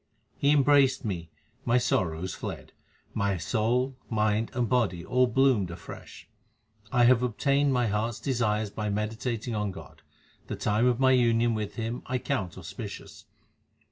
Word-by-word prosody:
He 140 Hz, -, +1 dB
embraced 140 Hz, -3 st, +4 dB
me; 85 Hz, -5 st, -4 dB, 0.3 s
my 120 Hz, +1 st, +3 dB
sorrows 90 Hz, -6 st, 0 dB
fled; -, -, -7 dB, 0.4 s
my 100 Hz, -2 st, 0 dB
soul, 120 Hz, +10 st, 0 dB
mind, 110 Hz, 0 st, +1 dB
and 120 Hz, -2 st, +1 dB
body 100 Hz, -8 st, 0 dB
all 125 Hz, 0 st, +3 dB
bloomed 120 Hz, -6 st, +2 dB
afresh. 85 Hz, -1 st, -10 dB, 0.6 s
1 120 Hz, +1 st, +4 dB
have 125 Hz, -1 st, +5 dB
obtained 140 Hz, +4 st, +1 dB
my 125 Hz, -2 st, +2 dB
heart 105 Hz, +1 st, 0 dB
s -, -, -10 dB
desires 110 Hz, -6 st, 0 dB
by 105 Hz, 0 st, -3 dB
meditating 110 Hz, +3 st, -3 dB
on 105 Hz, -1 st, -1 dB
God; 80 Hz, -7 st, -11 dB, 0.5 s
the -, -, -4 dB
time 110 Hz, +3 st, +1 dB
of 125 Hz, -1 st, +2 dB
my 130 Hz, 0 st, +5 dB
union 120 Hz, -2 st, +3 dB
with 105 Hz, -2 st, -4 dB
Him 115 Hz, +1 st, -3 dB
I 130 Hz, -, -2 dB
account 115 Hz, -9 st, -2 dB
auspicious. 95 Hz, +4 st, -8 dB
115 Hz, 150 wpm, -28 LUFS, 105-125 Hz, 0.6 s, have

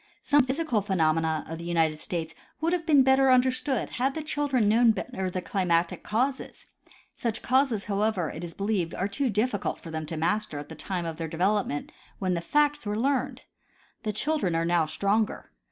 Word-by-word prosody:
Some 290 Hz, -1 st, +4 dB
physical 260 Hz, -5 st, 0 dB
phenomena 160 Hz, -5 st, +1 dB
of 165 Hz, 0 st, -6 dB
the -, -, -7 dB
United 165 Hz, -3 st, +1 dB
States 165 Hz, -1 st, -3 dB, 0.3 s
would 330 Hz, +3 st, 0 dB
have 345 Hz, -2 st, -2 dB
been 290 Hz, -4 st, +6 dB
better 265 Hz, 0 st, +4 dB
understood 255 Hz, +1 st, +2 dB
had 270 Hz, +1 st, +1 dB
the 315 Hz, -, -3 dB
children 285 Hz, -7 st, 0 dB
known 225 Hz, +2 st, +5 dB
better 190 Hz, -5 st, -4 dB
the 185 Hz, 0 st, -4 dB
climatic 175 Hz, -3 st, 0 dB
causes; 255 Hz, +6 st, -2 dB, 0.5 s
such 230 Hz, -2 st, -3 dB
causes 255 Hz, -5 st, +2 dB
however, 200 Hz, -4 st, 0 dB
it 160 Hz, -, -7 dB
is 170 Hz, -1 st, -7 dB
believed, 195 Hz, -5 st, -1 dB
are 195 Hz, -, -1 dB
too. 260 Hz, +6 st, -1 dB
dif 220 Hz, +4 st, +1 dB
ficult 205 Hz, -, -2 dB
for 165 Hz, -, -9 dB
them 160 Hz, -1 st, -4 dB
to 160 Hz, -, -4 dB
master 170 Hz, 0 st, -1 dB
at 145 Hz, -, -7 dB
the -, -, -7 dB
time 175 Hz, +2 st, -4 dB
of 165 Hz, -1 st, -4 dB
their 165 Hz, -1 st, -3 dB
development, 180 Hz, -2 st, -1 dB, 0.3 s
when 185 Hz, -2 st, -1 dB
the 170 Hz, -, -1 dB
facts 295 Hz, +8 st, +2 dB
Avere 210 Hz, 0 st, -2 dB
learned. 260 Hz, +2 st, 0 dB, 0.6 s
The 215 Hz, -, -2 dB
children 215 Hz, -, 0 dB
are 165 Hz, 0 st, +1 dB
now 170 Hz, -2 st, +2 dB
stronger. 205 Hz, +6 st, -1 dB
205 Hz, 190 wpm, -27 LUFS, 170-260 Hz, 0.6 s, been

